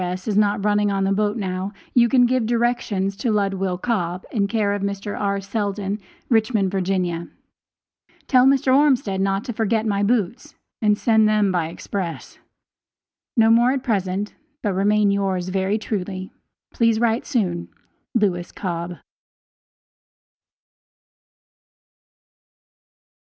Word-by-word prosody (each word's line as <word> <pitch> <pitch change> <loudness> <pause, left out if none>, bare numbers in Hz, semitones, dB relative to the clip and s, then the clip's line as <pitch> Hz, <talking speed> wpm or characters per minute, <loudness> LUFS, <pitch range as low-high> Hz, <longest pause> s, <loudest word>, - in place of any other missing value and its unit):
S., 180 +2 -4
is 210 - 0
not 205 -1 +2
running 205 -1 +2
on 195 -1 0
the 195 - +1
boat 210 +2 +1
now, 190 0 -3 0.2
you 235 -1 +5
can 250 -1 +5
give 245 -2 +1
directions 230 -5 0
to 240 - -1
Ludwill 195 -3 0
Cobb, 180 -6 -2
in 200 -4 +1
care 205 -2 0
of 205 - -3
Mr. 200 +1 -3
R. 200 -1 -1
Seldon, 200 0 -3 0.3
Richmond, 220 -4 +2
Va. 195 -1 -1 1.4
Tell 255 -1 +5
Mr. 265 -1 +4
Ormsted 260 -9 +2
not 195 +1 0
to 240 - -5
forget 220 0 0
my 200 -2 0
boots 215 0 -1 0.3
and 210 -1 +3
send 220 -1 +3
them 210 -2 +2
by 175 -3 0
express. 170 -3 -6 1.0
No 225 0 +5
more 240 +3 +5
at 270 -2 -3
present, 200 -2 -1 0.3
but 205 -3 0
remain 205 +2 +3
yours 190 -2 -1
very 190 +2 0
truly, 190 -3 -4 0.4
Please 230 -2 +2
write 230 0 +1
soon. 175 -8 -1 0.5
LEWIS 180 -6 0
COBB. 170 -3 -4
205 Hz, 130 wpm, -22 LUFS, 190-225 Hz, 1.4 s, you